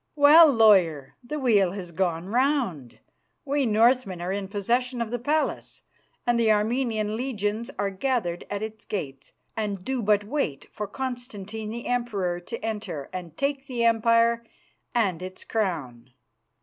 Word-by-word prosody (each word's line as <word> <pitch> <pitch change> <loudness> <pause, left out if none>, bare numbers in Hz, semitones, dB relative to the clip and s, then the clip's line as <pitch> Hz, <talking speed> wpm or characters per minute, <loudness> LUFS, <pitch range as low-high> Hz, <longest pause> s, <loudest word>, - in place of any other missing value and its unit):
Well, 300 +2 +8
lawyer, 185 - +4
the 300 +5 -4
wheel 210 -9 +3
has 185 -3 -7
gone 170 0 -1
round. 240 - 0 0.5
We 280 -2 +1
Northmen 225 -3 +3
are 175 +2 -3
in 195 0 -3
possession 240 +5 -1
of 230 -1 -2
the 245 - -2
palace 300 +6 -1 0.4
and 240 -1 +2
the 225 -2 +4
Armenian 215 0 0
legions 225 -2 -2
are 200 -1 -1
gathered 195 -5 -1
at 205 +1 -3
its 220 0 -7
gates 135 -9 -6 0.2
and 205 -4 -3
do 265 -2 -1
but 205 -1 +3
wait 205 - -2
for 210 - -5
Constantine 220 -4 -5
the 235 +2 -6
Emperor 205 -8 -1
to 230 +6 -6
enter 205 -10 -4
and 175 -3 -7
take 275 -1 -1
the 245 -3 -2
empire 230 0 +3 0.5
and 195 -8 +1
its 185 0 -8
crown. 145 - -3
220 Hz, 150 wpm, -26 LUFS, 190-245 Hz, 0.5 s, Well